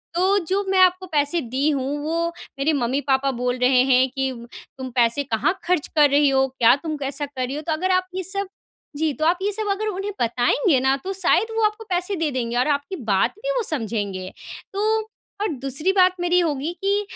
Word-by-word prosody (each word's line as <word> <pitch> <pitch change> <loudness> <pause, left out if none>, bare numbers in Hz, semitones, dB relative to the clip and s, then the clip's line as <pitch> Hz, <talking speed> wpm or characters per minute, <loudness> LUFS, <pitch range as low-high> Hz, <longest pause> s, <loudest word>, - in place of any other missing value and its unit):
तो 380 +3 +3
जो 395 +2 0
मैं 385 - +2
आपको 370 0 +4
पैसे 300 +1 +1
दी 265 +4 -1
हूँ 280 +1 -2
वो 335 +2 -1 0.3
मेरे 305 +3 +2
मम्मी-पापा 270 +1 0
बोल 250 0 -2
रहे 250 0 +4
हैं 255 0 +4
कि, 270 0 -2 0.5
"तुम 260 -1 -6
पैसे 240 +3 +2
कहाँ 225 - 0
खर्च 355 -4 0
कर 295 -1 +6
रही 285 0 +4
हो? 270 0 +2
क्या 245 -2 +4
तुम 310 +2 -5
कैसा 280 +1 -3
कर 265 -3 -4
रही 265 - -5
हो?" 300 - -4
तो 320 - 0
अगर 370 +4 -1
आप 370 0 +2
ये 375 - -2
सब 395 +2 -2 0.5
जी। 315 -1 +1
तो 310 +3 -2
आप 350 +2 +2
ये 410 - +1
सब 430 +1 -2
अगर 430 +2 -2
उन्हें 400 +1 -3
बताएँगे 245 - +2
ना 265 +1 +2
तो 390 - -2
शायद 450 +4 +2
वो 450 - +2
आपको 425 +1 -1
पैसे 360 +2 0
दे 325 -4 -1
देंगे, 240 -2 -2
और 250 - +2
आपकी 290 +6 -1 0.2
बात 190 - +2
भी - - -2
वो 480 - 0
समझेंगे। 205 - -3 0.4
तो 435 +2 0 0.3
और 425 - +1
दूसरी 275 +7 0
बात 370 -1 +4
मेरी 355 0 +2
होगी 310 -2 -1
कि 400 +1 +2
295 Hz, 215 wpm, -22 LUFS, 265-370 Hz, 0.5 s, कर